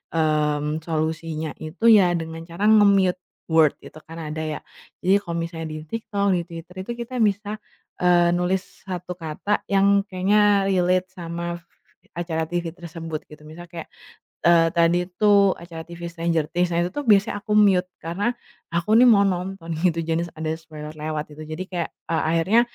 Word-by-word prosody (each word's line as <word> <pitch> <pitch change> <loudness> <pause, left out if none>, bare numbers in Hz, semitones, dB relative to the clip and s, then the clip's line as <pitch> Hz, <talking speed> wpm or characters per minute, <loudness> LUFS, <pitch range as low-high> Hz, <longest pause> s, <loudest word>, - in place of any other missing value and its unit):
mmm, 150 -1 +1
solusinya 160 -1 -2
itu 155 +7 -9
ya 190 -5 +6
dengan 165 -1 -5
cara 170 +3 -6
nge-mute 200 -4 +5 0.3
word 160 -2 +5
itu 155 - -12
kan 165 +1 -9
ada 155 0 -5
ya, 155 -1 -3 0.4
jadi 195 +2 +4
kalau 170 -4 -6
misalnya 165 -1 -5
di - - -5
TikTok 205 -2 -2
di 180 -2 +2
Twitter 170 +1 -10
itu - - -3
kita 235 +2 -6
bisa, 210 0 0 0.4
eee, 175 -1 +4
nulis 180 +3 -2
1 180 -1 -5
kata 165 +6 -2
yang 200 0 +3
kayaknya 200 +1 +3
relate 185 0 +1
sama, 170 -1 -5 0.6
acara 165 -2 -2
TV 175 0 -2
tersebut 165 -2 -6
gitu 150 0 -14
misalnya 170 +3 -11
kayak, 170 -2 -8 0.6
eee, 170 -1 +6
tadi 170 +1 +4
itu 200 +1 +4
acara 165 -1 -9
TV 170 0 -10
Stranger 165 -2 0
Things, 175 +1 +1
nah 170 - +1
itu 175 - -3
tuh 290 - -3
biasanya 205 -1 +4
aku 210 - -2
mute 195 -4 +5 0.2
karena 195 +9 -1 0.4
aku 175 +6 +2
nih 250 - +7
mau 200 -3 +6
nonton 180 -1 -4 0.2
gitu 165 -2 +2
jangan 165 +1 -1
ada 160 0 -2
spoiler 155 -2 -9
lewat 155 0 -4
gitu 155 +1 -9
jadi 155 +3 -4
kayak 175 -2 -2 0.2
a - - +2 0.2
akhirnya, 195 +8 +4
175 Hz, 170 wpm, -23 LUFS, 160-195 Hz, 0.6 s, nih